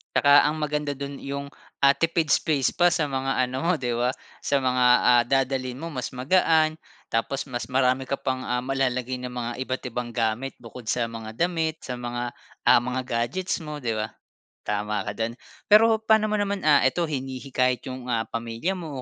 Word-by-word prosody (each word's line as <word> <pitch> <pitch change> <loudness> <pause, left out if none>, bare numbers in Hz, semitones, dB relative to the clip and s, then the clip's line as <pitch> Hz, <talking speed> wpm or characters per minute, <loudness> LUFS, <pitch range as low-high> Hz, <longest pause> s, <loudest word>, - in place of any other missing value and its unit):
Tsaka 145 0 +6
ang 150 - -1
maganda 150 -1 -1
do'n 140 0 -6
'yong, 140 0 -5 0.4
ah, 140 - +8
tipid 165 -1 0
space 145 -5 +2
pa 175 0 +4
sa 150 - 0
mga 135 -1 0
ano 130 +1 -5
mo 180 - +3
'di 125 -5 -2
ba? 120 +1 +2 0.3
Sa 140 - +1
mga, 125 -1 +2 0.2
ah, 120 -1 +6
dadalhin 130 -1 0
mo 165 - -5
mas 130 -4 -4
magaan, 155 +3 +3 0.4
tapos 115 +4 -1
mas 120 -2 -4
marami 130 0 +2
ka 140 - 0
pang, 130 -1 -2
ah, 125 0 -1
malalagay 130 -1 -1
na 125 0 -6
mga 120 -1 -3
iba't 130 0 -4
ibang 125 0 -4
gamit 115 +3 -1
bukod 115 0 -11
sa 120 -1 0
mga 110 -1 -7
damit, 160 +1 -1
sa 125 -1 -5
mga, 120 0 -3 0.4
ah, - - +8
mga 125 +2 -2
gadgets 125 +10 -2
mo 150 -1 -6
'di 115 -2 0
ba? 110 0 -1 0.5
Tama 105 0 -2
ka 100 +1 -5
d'yan, 115 +1 -1 0.3
pero 220 +1 +6
pa'no 220 -1 +3
mo 215 - +1
naman, 200 -1 -1
ah, 150 -2 +5
ito 130 +7 +2
hinihikayat 130 -2 -1
'yong, 130 -1 -7
ah, 115 -1 -1
pamilya 115 +11 -3
mo 155 -7 -6
130 Hz, 190 wpm, -25 LUFS, 120-150 Hz, 0.5 s, ah